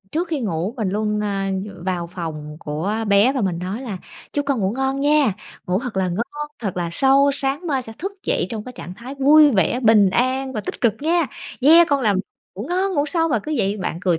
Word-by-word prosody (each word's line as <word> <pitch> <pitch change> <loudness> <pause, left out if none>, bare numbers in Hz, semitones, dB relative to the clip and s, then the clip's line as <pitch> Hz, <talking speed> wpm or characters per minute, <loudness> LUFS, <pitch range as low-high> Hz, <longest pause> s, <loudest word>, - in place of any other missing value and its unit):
trước 335 +3 -1
khi 310 -4 -2
ngủ 195 0 -2
mình 220 -5 -1
luôn, 210 +2 -1
a, 195 -1 -1 0.2
ờ, 185 -3 -11
vào 180 -2 -2
phòng 155 -4 -6
của 160 +9 -2
bé 205 +6 +5
và 265 - -2
mình 185 -5 -1
nói 190 +8 -4
là 205 -7 -5 0.3
"Chúc 290 -1 -1
con 270 -6 0
ngủ 190 +2 0
ngon 270 +2 -1
nha, 290 -7 +3 0.3
ngủ 180 +2 +1
thật 245 -5 -6
là 185 -1 +1
ngon, 240 +11 -4
thật 200 -6 -4
là 175 -1 -1
sâu, 275 +5 +4
sáng 280 +5 -2
mai 270 -4 0
sẽ 225 - -7
thức 390 +5 -4
dậy - - 0
trong 215 -2 -5
cái 250 - -8
trạng 180 -7 -9
thái 250 +5 -9
vui 290 +2 +6
vẻ, 220 - +1
bình 215 -5 +5
an 260 +4 0
và 215 - -3
tích - - -7
cực 230 -4 +3
nha. 330 +1 +2 0.3
Yeah, 325 +5 +7
con 285 -1 +2
làm 210 -6 +2 0.4
ngủ 200 - -6
ngon, 375 +1 0
ngủ 285 +1 +1
sâu." 330 0 +1
Mà 240 - +1
cứ 305 +9 -4
vậy 200 0 0
bạn 180 -4 -3
cười 180 -3 +1
230 Hz, 235 wpm, -21 LUFS, 190-280 Hz, 0.4 s, Yeah